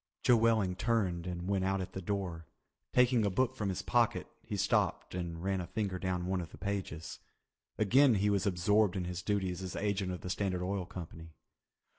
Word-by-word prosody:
Joe 125 - +6
Welling 110 -5 +3
turned 95 -5 0
and 90 0 -4
went 100 -1 +1
out 95 +1 +1
at 95 - -5
the 95 - -4
door. 90 -4 -3 0.4
Taking 125 -2 +4
a 100 - +2
book 130 +6 +1
from 105 -5 -2
his 95 - -3
pocket, - - +2 0.2
he - - -5
stopped - - +1
and 85 -2 -4
ran 95 -1 0
a 85 - -6
finger 100 -4 -2
down 90 -1 -1
one 95 0 0
of 85 - -7
the - - -13
pages. 90 -6 -4 0.6
Again 120 +5 +5
he 105 +1 +2
was 100 0 +1
absorbed 100 +2 +3
in 95 - -1
his 90 0 -4
duties 95 -2 -1
as 95 -1 -5
agent 100 -2 -1
of 90 - -5
the 90 - -4
Standard 95 -2 -1
Oil 95 -1 -2
Company. 80 -2 -9
95 Hz, 200 wpm, -33 LUFS, 90-105 Hz, 0.6 s, Joe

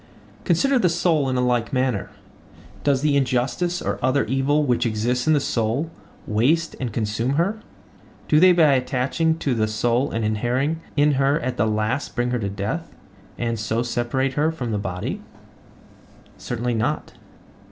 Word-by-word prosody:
Consider 255 +10 +3
the 180 - +3
soul 165 -4 +1
in 130 - -1
like 125 -1 +1
manner. 130 -6 0 0.7
Does 140 -2 +2
the 150 -2 +3
injustice 135 +7 0
or - - -3
other 130 +2 +2
evil 135 +5 +1
which 120 -4 +1
exists 120 +3 -1
in 155 - +5
the 150 - +4
soul 125 +5 -1 0.3
waste 145 +10 +1
and 125 -3 -3
consume 115 +4 -1
her? 195 +8 0 0.7
Do 150 - +4
they 185 +2 +7
by 160 -5 +5
attaching 135 +5 0
to 140 -5 -1
the 110 -2 +1
soul 120 +5 0
and 115 -1 -2
inhering 125 +9 0 0.2
in 145 +1 +4
her 140 +2 +3
at 125 0 -3
last 110 +5 0
bring 120 0 0
her 125 - 0
to 100 -3 -2
death, 105 - -4 0.4
and 115 -2 -2
so 110 +3 -1
separate 125 +2 -1
her 150 +3 +1
from 125 -8 -4
the 105 - -1
body? 95 -2 -4 1.1
Certainly 120 0 -3
not. 110 -1 -2
130 Hz, 160 wpm, -23 LUFS, 115-150 Hz, 1.1 s, they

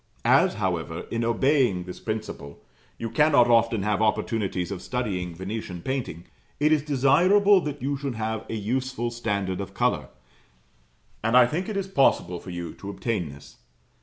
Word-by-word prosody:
As, - - +4
however, - - -2
in 115 0 -1
obeying 115 -4 +2
this 90 0 -9
principle, 110 -10 -6 0.3
you 115 - -4
cannot 125 0 +4
often 115 -3 +3
have 105 +1 0
opportunities 105 -4 0
of 95 -3 -5
studying 95 -9 -3
Venetian 95 -1 -6
painting, 125 - -4 0.3
it 150 +1 +3
is 155 -2 +4
desirable 180 +9 +4
that 145 -4 -5
you 140 +1 0
should 135 -3 -4
have 110 0 -3
a - - -3
useful 120 +2 -2
standard 100 -5 -2
of 95 - -8
colour, - - 0 1.2
and 115 +3 +4
I 125 - +8
think 165 - -3
it 210 - -3
is 195 -1 -2
possible 90 - +2
for 95 - -11
you 85 -1 -5
to 100 - -9
obtain 100 -5 -2
this. 70 0 -13
115 Hz, 165 wpm, -25 LUFS, 95-135 Hz, 1.2 s, I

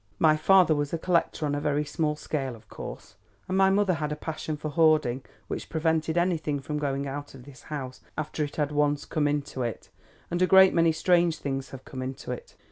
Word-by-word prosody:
"My 155 -1 +5
father 180 +1 +5
was 145 0 -2
a - - +1
collector, 170 -2 0
on 145 - -1
a 145 - -1
very 150 0 0
small 150 +1 -1
scale 135 -4 -3
of 110 - -18
course, 105 - -9 0.3
and 185 - -2
my 190 0 +5
mother 195 -1 +3
had 150 -2 -2
a - - -1
passion 155 0 -4
for 155 +1 -4
hoarding 155 -5 +3 0.3
which - - -5
prevented 160 0 0
anything 160 -5 +1
from 150 +2 -4
going 140 -1 -1
out 145 +1 -6
of 130 - -12
this 135 -1 -14
house 135 -4 -5 0.2
after 155 0 -2
it 145 - -5
had 150 -1 0
once 145 -1 +1
come 150 -3 0
into 145 -2 -2
it, 120 -2 -4 0.4
and 175 +1 -1
a 185 - +5
great 190 0 +7
many 165 -1 +4
strange 170 0 +2
things 135 -2 -4
have 130 -1 -10
come 130 - -7
into 130 0 -5
it. 125 - -7
150 Hz, 215 wpm, -27 LUFS, 140-160 Hz, 0.4 s, great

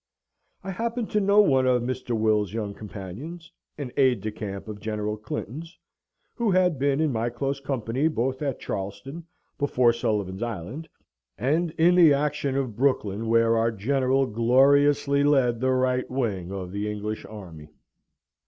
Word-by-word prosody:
I 190 - -4
happened 230 +4 -3
to 210 - +2
know 200 +1 +5
one 135 -9 +3
of 125 -2 +2
Mr. 125 -1 -2
Will's 105 -3 +1
young 105 -3 -3
companions, 110 - -9 0.3
an 140 -4 -5
aide 130 -6 +3
de 110 +2 -3
camp 100 -2 -6
of 105 -1 -7
General 105 0 -3
Clinton's, 135 - -7 0.6
who 235 -3 -1
had 180 -6 +2
been 140 +1 +1
in 155 -2 +2
my 115 0 -1
close 135 +3 -3
company 135 0 -1
both 130 -3 -1
at 140 -4 -2
Charleston, 100 - -6 0.3
before 125 -4 +3
Sullivan's 105 -5 -2
Island, 120 - -5 0.5
and 155 +8 +1
in 170 +2 +5
the 170 -5 +7
action 140 -1 -1
of 130 -6 -2
Brooklyn, 115 -4 0
where 115 0 +3
our 115 +1 +2
General 130 +5 +1
gloriously 140 +4 +3
led 130 -5 +3
the 130 +2 +1
right 130 0 +1
wing 105 -9 -2
of 95 -2 -5
the 100 +2 -3
English 105 +1 -4
army. 85 -8 -10
125 Hz, 155 wpm, -25 LUFS, 110-140 Hz, 0.6 s, the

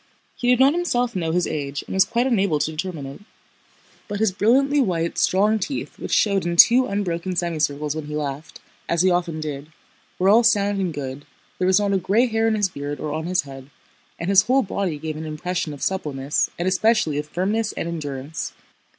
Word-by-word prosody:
He 245 - -3
did 250 -1 +4
not 270 +2 +5
himself 245 - -1
know 165 -3 -1
his 180 +1 +1
age 140 -2 -4
and - - -7
was 190 0 +4
quite 240 +2 0
unable 200 -10 +2
to 155 - -1
determine 160 -2 -5
it. 135 +7 -9 0.9
But 205 -1 -4
his 220 -2 +2
brilliantly 270 +9 +3
white, 170 -7 -1
strong 210 +4 +2
teeth 270 +8 -5
which - - -6
showed 200 -3 +2
in 170 0 -2
two 245 +8 +7
unbroken 185 -2 -2
semicircles 155 -4 -1
when 155 -1 -5
he 150 - -5
laughed—as 150 +3 -4
he 185 - +4
often 175 -2 -1
did—were 155 +4 -6
all 220 +4 +6
sound 205 -3 +2
and 180 -3 -1
good, 145 -1 -6 0.3
there 185 - +1
was 190 +2 +4
not 200 -1 0
a - - +3
gray 200 +6 +2
hair 225 -2 0
in 220 - +2
his 205 -2 +2
beard 145 -3 -6
or 150 -1 -4
on 160 +2 -3
his 180 -3 +1
head, 135 -1 -11 0.5
and 170 +4 -2
his 195 -1 +7
whole 255 +6 +2
body 190 -5 -2
gave 155 +1 -5
an 160 - -6
impression 160 +2 -3
of 145 - -8
suppleness 150 -6 -1
and 175 - -2
especially 185 -5 +2
of 150 - -5
firmness 205 +7 -1
and - - -4
endurance. 150 -2 -5
180 Hz, 200 wpm, -22 LUFS, 150-205 Hz, 0.9 s, two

